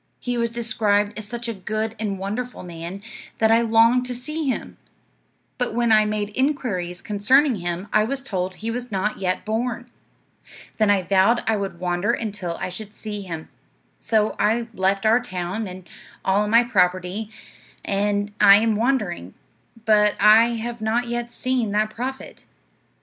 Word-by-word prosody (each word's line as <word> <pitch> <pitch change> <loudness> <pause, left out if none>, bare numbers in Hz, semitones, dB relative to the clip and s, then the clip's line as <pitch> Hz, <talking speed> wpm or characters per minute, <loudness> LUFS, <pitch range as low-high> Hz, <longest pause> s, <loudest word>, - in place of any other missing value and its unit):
He 245 -1 -3
was 235 -1 0
described 220 -3 0
as 215 -1 -7
such 240 +2 -5
a 230 - -2
good 215 +3 -3
and 205 -3 -2
wonderful 215 +6 -5
man, 175 +3 -7 0.3
that 220 0 +3
I 230 +1 +5
longed 230 +2 +4
to 250 - -3
see 305 +5 -4
him; 255 - -4 0.8
but 245 -3 -1
when 235 -1 +2
I 215 -1 +6
made 210 -1 -2
inquiries 215 -11 -1
concerning 250 +6 +3
him 175 +2 -4
I 215 - +5
was 270 +4 -3
told 185 -6 -3
he 225 +4 -4
was 245 0 -5
not 200 +2 -1
yet 185 -1 -1
born. 235 +2 -2 0.9
Then 215 -1 +3
I 200 -2 +3
vowed 195 +6 +3
I 225 - +2
would 195 -4 -4
wander 180 +2 0
until 200 -6 -4
I - - -2
should 205 +3 -9
see 210 -2 -6
him. 165 -5 -7 0.5
So 215 -1 +1
I 230 +2 +1
left 195 +1 0
our 225 +3 +5
town, 195 -2 -4
and 185 -1 -10 0.4
all 200 +2 +2
my 230 +3 +5
property, 185 -1 0 0.6
and 205 +1 0
I 200 - +9
am 220 +1 +3
wandering, 210 - -1 0.5
but 210 -1 +4
I 215 +3 +7
have 235 0 -5
not 235 +2 0
yet 240 0 -3
seen 245 -2 -1
that 215 +1 +1
prophet.' 260 +4 -6
215 Hz, 165 wpm, -23 LUFS, 195-235 Hz, 0.9 s, I